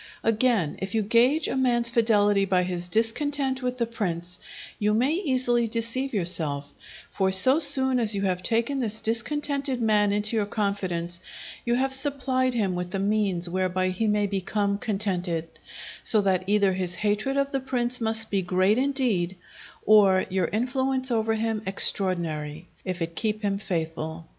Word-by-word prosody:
Again, 225 - +1
if 190 +2 -4
you 220 - +1
gauge 245 +9 +3
a - - -2
man's 245 -3 +1
fidelity 210 -4 +2
by 185 -2 +1
his 180 -1 -4
discontent 265 - +1
with 250 0 -3
the 235 - 0
prince, 180 -6 -3 0.4
you 210 0 +1
may 250 +6 +2
easily 255 - 0
deceive 230 +4 -2
yourself; 160 -8 0 0.4
for 190 -1 0
so 255 +10 +5
soon 265 -4 +4
as 220 -3 +2
you 200 - -2
have 185 -2 -1
taken 235 +6 0
this 220 -3 -2
discontented 275 +3 0
man 210 -3 +2
into 210 +2 -1
your 210 -2 0
confidence, 185 -5 -2 0.5
you 240 0 +1
have 265 +1 0
supplied 265 -2 +1
him 200 -5 0
with 180 0 -4
the 195 - -3
means 195 -3 0
whereby 185 +1 -1
he 185 +4 -2
may 210 -1 +1
become 200 +1 -1
contented; 185 -6 -2 0.6
so 220 - +5
that 190 -2 0
either 200 -2 +2
his 185 -1 -2
hatred 215 +7 -1
of 275 0 0
the 270 - -1
prince 250 -2 -1
must 225 0 0
be 200 -2 +1
great 185 +5 +1
indeed, 250 -10 0 0.5
or 200 -3 +5
your 185 -3 0
influence 260 +3 -1
over 225 -1 +1
him 220 -1 -2
extraordinary, 170 -5 -1 0.2
if 185 -2 -3
it 165 0 -6
keep 215 +2 -2
him 200 -1 -1
faithful. 165 -3 -4
210 Hz, 160 wpm, -25 LUFS, 185-245 Hz, 0.6 s, so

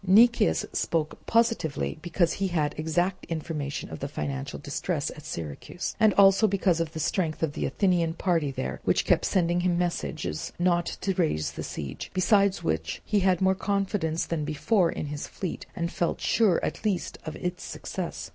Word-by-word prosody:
Nicias 200 - +5
spoke 160 -2 -1
positively 225 -10 +1
because 170 0 +1
he 195 - -1
had 155 -5 0
exact 175 +4 0
information 155 -3 -4
of 80 - -6
the - - -3
financial 70 -2 -4
distress - - -2
at - - -10
Syracuse, 80 - -5
and 220 -2 +6
also 195 +2 +6
because 190 -4 +2
of 165 -1 -2
the 160 - -5
strength 160 0 -1
of 150 -3 0
the - - -1
Athenian 175 -4 +1
party 165 -7 +1
there 65 - -4
which - - +2
kept - - +3
sending 175 -2 +2
him 175 -1 +1
messages 80 - -2
not 175 -1 +2
to 195 - 0
raise 115 - 0
the - - -6
siege; 70 -4 -6
besides 200 0 +3
which 80 0 -1
he 210 - +2
had 185 -2 +2
more 190 0 +4
confidence 195 -4 -1
than 165 -3 -2
before 165 +5 +2
in - - -4
his 145 0 -5
fleet, 185 - -5
and 170 +1 -2
felt 170 - -1
sure 210 -7 +3
at - - -4
least 205 -5 -1
of 155 - -6
its 180 0 -4
success. - - -5
175 Hz, 175 wpm, -27 LUFS, 155-190 Hz, -, and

